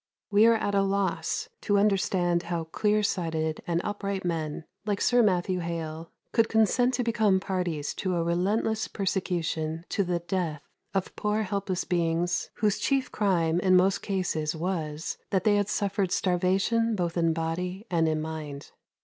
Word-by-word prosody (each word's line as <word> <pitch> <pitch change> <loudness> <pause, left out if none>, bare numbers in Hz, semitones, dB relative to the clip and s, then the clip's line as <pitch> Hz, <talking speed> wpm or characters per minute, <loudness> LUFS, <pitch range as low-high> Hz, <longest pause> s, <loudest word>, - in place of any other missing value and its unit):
We 210 +2 +6
are 230 - +6
at 205 -2 -1
a 200 - +4
loss 195 - -1
to 205 -2 +2
understand 190 -4 +2
how 170 -2 -1
clear 210 +6 +1
sighted 160 -5 -1
and 170 -1 +1
upright 200 -2 -3
men, 160 -3 -2 0.2
like 205 -1 -1
Sir 245 0 +4
Matthew 185 -3 +2
Hale, 165 -1 -5 0.2
could 230 -1 +3
consent 245 +3 +3
to 245 - 0
become 215 -4 +2
parties 180 -6 -2
to 185 -2 -1
a 170 - +1
relentless 200 +6 0
persecution 170 -4 -2
to 200 - +1
the 180 -1 0
death 170 -4 -3 0.3
of 190 - -1
poor 210 +1 0
helpless 195 -2 -2
beings 175 0 0
whose 210 -2 +1
chief 270 -2 0
crime, 175 -5 +1
in 185 0 +4
most 185 +2 +3
cases, 170 -6 -1
was, 160 -3 -3
that 190 - +1
they 215 - +4
had 205 0 0
suffered 200 -3 0
starvation 195 +5 +1
both 175 -3 -1
in 165 -1 +2
body 180 +5 -3
and 165 -2 +3
in 155 0 0
mind. 155 -3 -6
185 Hz, 160 wpm, -27 LUFS, 165-205 Hz, 0.3 s, We